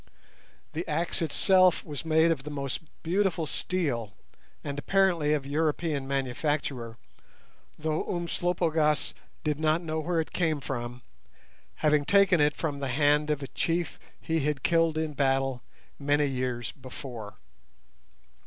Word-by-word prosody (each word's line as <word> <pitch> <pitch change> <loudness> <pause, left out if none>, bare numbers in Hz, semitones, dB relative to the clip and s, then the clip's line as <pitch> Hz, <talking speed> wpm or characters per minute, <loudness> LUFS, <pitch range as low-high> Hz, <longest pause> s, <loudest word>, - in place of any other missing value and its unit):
The 165 - -2
axe 165 +4 -1
itself 185 +3 +4
was 150 -1 -5
made 160 +1 +4
of 155 -5 0
the 150 - -7
most 140 -2 -3 0.2
beautiful 175 -1 +1
steel, 140 - -2 0.5
and 145 0 -4
apparently 175 -4 +2
of 140 -3 -3
European 150 -1 0
manufacture, 135 -3 -2 0.8
though 155 0 -1
Umslopogaas 170 -3 0 0.3
did 150 -1 0
not 155 +2 +2
know 160 -1 -2
where 165 +1 0
it 160 - -3
came 160 -4 +1
from, 125 -2 -5 0.8
having 150 -1 +4
taken 195 -1 +5
it 145 0 +3
from 145 -4 -2
the 140 - -2
hand 145 +3 +3
of 150 -2 0
a - - -4
chief 170 -1 -1 0.2
he 160 0 -1
had 150 -2 -1
killed 165 -2 +3
in 155 -1 -1
battle 135 -2 +1 0.4
many 145 +1 +2
years 125 -4 -2
before. 125 -6 -9
150 Hz, 135 wpm, -28 LUFS, 135-165 Hz, 0.8 s, taken